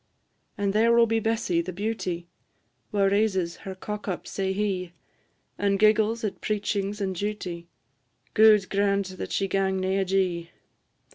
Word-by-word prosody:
And 200 -1 0
there 225 +2 +4
will 235 0 +6
be 225 0 +1
Bessy, 220 -6 0
the 180 +2 -5
beauty, 185 -3 -3 0.6
Wha 205 -2 +1
raises 195 -3 +1
her 190 -1 -7
cock 210 +3 -6
up 185 - -3
sae 190 -1 -2
hie, 190 -3 -2 0.7
And 200 -1 +2
giggles 215 +2 +3
at 210 - -3
preachings 205 -1 -1
and 195 -2 -1
duty; 180 -3 -4 0.7
Gude 215 -3 +6
grant 200 -1 0
that - - -5
she 195 - 0
gang 190 0 0
nae 190 +1 0
ajee! 180 -3 0
195 Hz, 145 wpm, -26 LUFS, 185-210 Hz, 0.7 s, will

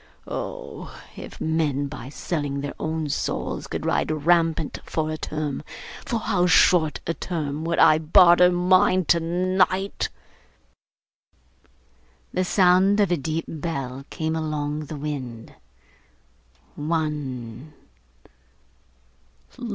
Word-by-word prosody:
Oh! - - -7 0.2
if - - -10
men 155 -3 0
by 140 -3 -7
selling 145 -2 -3
their 145 - -4
own 160 0 -2
souls - - -3
could - - -4
ride - - +1
rampant 165 0 +1
for 155 -1 -2
a 155 - -3
term, 150 -3 -3 0.5
for 230 - 0
how 180 -4 +1
short 165 -2 +4
a 165 - -1
term 155 -4 -4
would 170 0 0
I 155 - +6
barter 175 +2 +6
mine 185 0 +3
tonight!' 185 +4 +1 2.2
The 185 - +1
sound 185 +2 +4
of 200 -4 +3
a - - +4
deep 160 +2 -3
bell 140 -5 -4
came 160 -1 -2
along 150 -1 -2
the 150 +1 -7
wind. 130 -6 -6 1.2
One. 150 -4 -3
160 Hz, 105 wpm, -24 LUFS, 145-175 Hz, 2.2 s, I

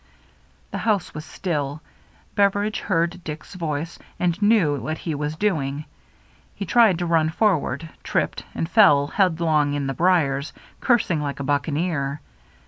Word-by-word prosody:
The - - -3
house 210 -6 0
was 150 0 -7
still. 155 -3 -3 0.5
Beveridge 205 +1 +1
heard 170 -1 -1
Dick's 150 +3 -7
voice, 165 -2 -4 0.2
and 180 +2 0
knew 205 -9 +4
what 155 +7 -3
he 165 - -4
was 150 +1 -3
doing. 155 -6 -1 0.7
He 200 - -4
tried 220 -3 +4
to 175 - -2
run 165 -2 +2
forward, 165 -5 0
tripped, - - -1
and 165 - -1
fell 165 -8 +5
headlong 160 -4 +1
in 145 -1 -2
the 135 - -2
briers, 150 -3 +1 0.3
cursing 205 -10 +2
like 140 -1 -4
a - - -3
bucca 145 +3 0
neer. 145 -3 -1
160 Hz, 145 wpm, -23 LUFS, 145-185 Hz, 0.7 s, fell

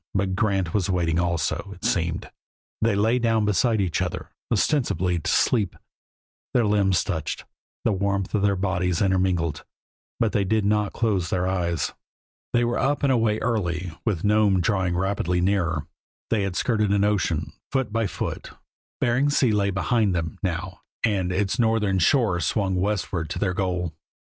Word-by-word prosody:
But 95 -1 +1
Grant 95 -5 0
was 100 -3 0
waiting 85 -3 +1
also, 85 -3 -1
it - - -9
seemed. - - -1 0.5
They 110 -2 +2
lay 110 +5 +2
down 115 -2 +2
beside 110 +2 +2
each 90 -4 0
other, - - -4 0.2
ostensibly 100 - +1
to - - -3
sleep; 105 -7 +2 0.8
their 120 -2 +4
limbs 100 -3 +2
touched; 80 -6 -3 0.4
the 115 - +3
warmth 100 -1 -1
from 105 - +1
their 100 0 +2
bodies 90 -2 0
intermingled, 90 -6 +1 0.6
but 115 -3 +2
they 100 +1 +1
did 105 +2 +1
not 105 0 +1
close 100 -7 0
their 90 0 0
eyes. 85 -3 -1 0.6
They 120 - +2
were 120 0 0
up 145 +1 0
and 140 - +4
away 115 -4 +2
early, 90 -7 -1
with 100 -8 -1
Nome 105 -2 +3
drawing 90 -2 0
rapidly 90 -2 0
nearer. 90 -5 0 0.5
They 110 -3 +2
had 100 -2 -2
skirted 105 -1 +1
an 100 0 +3
ocean, 95 -7 0 0.2
foot 130 -6 -1
by 115 -2 +1
foot; - - -5 0.5
Bering 125 +4 +2
Sea 135 -5 +3
lay 100 -1 +2
behind 100 +1 +1
them, 80 -2 -3
now, 90 0 -3 0.2
and 95 -5 +1
its 95 +4 0
northern 110 -4 +2
shore 100 - +3
swung 95 +2 0
westward 90 -3 -1
to - - -4
their 95 -3 0
goal. 90 -3 -2
100 Hz, 165 wpm, -24 LUFS, 90-110 Hz, 0.8 s, their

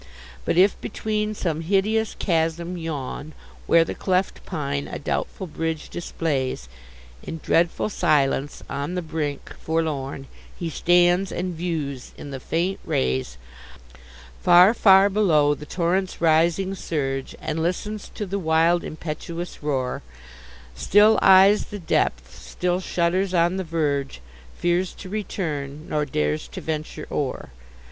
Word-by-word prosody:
But, - - 0
if 195 +3 +4
between 215 0 -2
some 165 -5 -2
hideous 205 +5 +1
chasm 170 0 0
yawn, 155 -2 -5 0.3
Where 165 0 +6
the - - -4
cleft 185 0 -1
pine 140 -2 -3
a - - -5
doubtful 190 +6 -3
bridge 160 -1 -4
displays, 135 - -2 0.5
In 165 - -6
dreadful 170 +4 +2
silence, 145 -7 +1
on 140 +6 -3
the 180 - -2
brink, 150 -3 -4
forlorn 145 -4 -2 0.3
He 170 -2 -4
stands, 175 +4 +3
and 180 0 -3
views 155 -6 -4
in 145 - -8
the 135 - -5
faint 170 +8 -1
rays 65 -1 -1 1.0
Far, 180 +4 +7
far 195 -3 +6
below, 165 -8 +3
the 150 0 -9
torrent's 185 +3 -1
rising 170 +4 +3
surge, 135 -7 -3
And 160 +1 -3
listens 200 +5 -3
to 210 - -3
the 200 +1 -3
wild 165 0 +3
impetuous 165 +2 -6
roar; 135 -4 -1 0.7
Still 210 - +5
eyes 195 +2 +6
the 205 - -7
depth, 60 - -1
still 180 0 -1
shudders 185 +1 0
on 175 +2 +3
the 190 - -2
verge, 145 - -1 0.4
Fears 175 +1 0
to 185 - -10
return, 155 -8 -4
nor 150 -1 0
dares 75 - -1
to - - -8
venture 155 -1 -4
o'er. 135 - -3
165 Hz, 130 wpm, -24 LUFS, 145-185 Hz, 1.0 s, Far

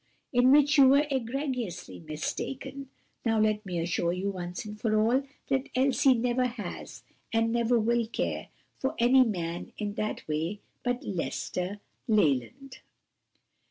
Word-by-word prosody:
"In 250 +1 +5
which 290 +1 +5
you 270 - +9
were 280 +2 +5
egregiously 250 - -3
mistaken. 265 - -5 0.3
Now 225 -2 +2
let 215 0 +2
me 180 -2 -3
assure 170 0 0
you 190 +2 -2
once 180 +1 -5 0.2
for 215 -2 +2
all, 235 +5 +3 0.3
that 270 0 0
Elsie 265 0 +4
never 245 +2 +1
has 225 -7 -7 0.3
and 225 0 +2
never 235 +1 +2
will 235 +1 +1
care 230 - -3 0.3
for 270 +4 -1
any 255 +2 +6
man 175 -7 -3
in 205 -1 -3
that 215 0 -3
way 160 +6 -2 0.2
but 245 0 -1
Lester 185 +1 -3 0.3
Leland." 220 - +1
230 Hz, 135 wpm, -29 LUFS, 185-260 Hz, 0.3 s, you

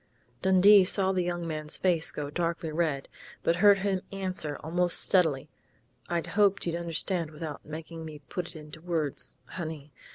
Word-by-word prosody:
Dundee 190 +2 +7
saw 190 0 +2
the 185 -1 +1
young 175 -1 -2
man's 155 -1 -3
face 170 -3 +1
go 145 -1 -5
darkly 165 0 -2
red, 155 -4 -1 0.4
but 170 - +2
heard 200 +1 +6
him 190 -1 -1
answer 185 -6 -2
almost 175 +2 +2
steadily: 155 -7 +2 0.6
"I 170 -1 -1
hoped 200 -1 +2
you'd 170 - -1
understand 170 0 -1
without 155 -1 -7
making 160 +2 -8
me 155 -1 -8
put 175 +6 -4
it - - -12
into 150 0 -10
words, 155 -7 -2
honey.... 155 -5 -7
170 Hz, 160 wpm, -28 LUFS, 155-185 Hz, 0.6 s, Dundee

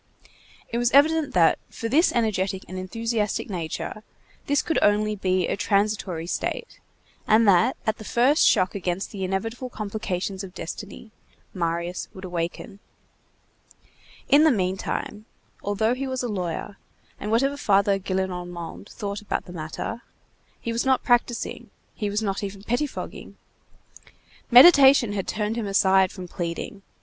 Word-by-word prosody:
It 235 - -2
was 240 -1 +2
evident 305 0 +4
that, 170 -2 +4
for 230 - -5
this 310 +9 +4
energetic 195 -5 0
and 185 - -8
enthusiastic 215 +3 -2
nature, 170 +4 -4 0.5
this 285 0 +2
could 325 - 0
only 210 +1 +2
be 185 -2 0
a - - -1
transitory 200 -5 0
state, 175 - -4 0.5
and 220 +1 +5
that, 200 +6 +4
at 220 0 -1
the - - -8
first 250 +7 +3
shock 185 -4 +3
against 185 0 -3
the 195 -3 -5
inevitable 225 +7 -3
complications 200 -3 -4
of 190 -1 -10
destiny, 205 +5 -8 0.4
Marius 170 0 -2
would 190 0 -8
awaken. 175 +2 -4 1.5
In 285 +2 +6
the 315 - +6
meantime, 195 0 -2 0.4
although 205 +3 0
he 270 +2 -3
was 260 -1 -3
a - - -1
lawyer, 200 0 -4 0.4
and 210 - -4
whatever 270 +6 +2
Father 200 -5 +2
Gillenormand 180 -1 -4
thought 200 0 -5
about 210 - -3
the 180 - -10
matter, 165 +8 -5 0.6
he 230 - -4
was 230 - 0
not 265 -1 +2
practising, 240 -1 0 0.2
he 210 -3 -3
was 210 +2 -1
not 200 0 -2
even 195 0 -6
pettifogging. 250 +6 -4 1.1
Meditation 265 -4 +8
had 195 -2 -3
turned 210 +1 -2
him 225 -3 -2
aside 190 -1 +4
from 185 -2 -8
pleading. 175 +3 -5
205 Hz, 140 wpm, -24 LUFS, 185-230 Hz, 1.5 s, Meditation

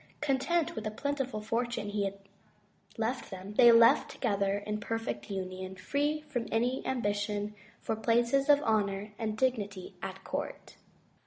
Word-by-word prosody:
Content 300 +4 +1
with 220 - -5
the 215 - -1
plentiful 265 -1 -2
fortune 230 -1 -2
he 205 -1 0
had 195 0 -3 0.8
left 235 +3 -2
them, 190 +1 -7
they 240 +2 +8
lived 230 0 +6
together 200 -4 0
in 210 +1 -3
perfect 225 +2 -3
union, 185 -1 -4
free 290 +10 -1
from 285 -6 -4
any 245 +3 +1
am 260 -2 -1
bition 205 0 -1 0.3
for 225 - -2
places 235 +5 +2
of 290 0 +6
honor 205 -1 0
and 215 -1 -2
dignity 205 -7 -1
at - - -6
court. - - -5
220 Hz, 150 wpm, -31 LUFS, 205-255 Hz, 0.8 s, they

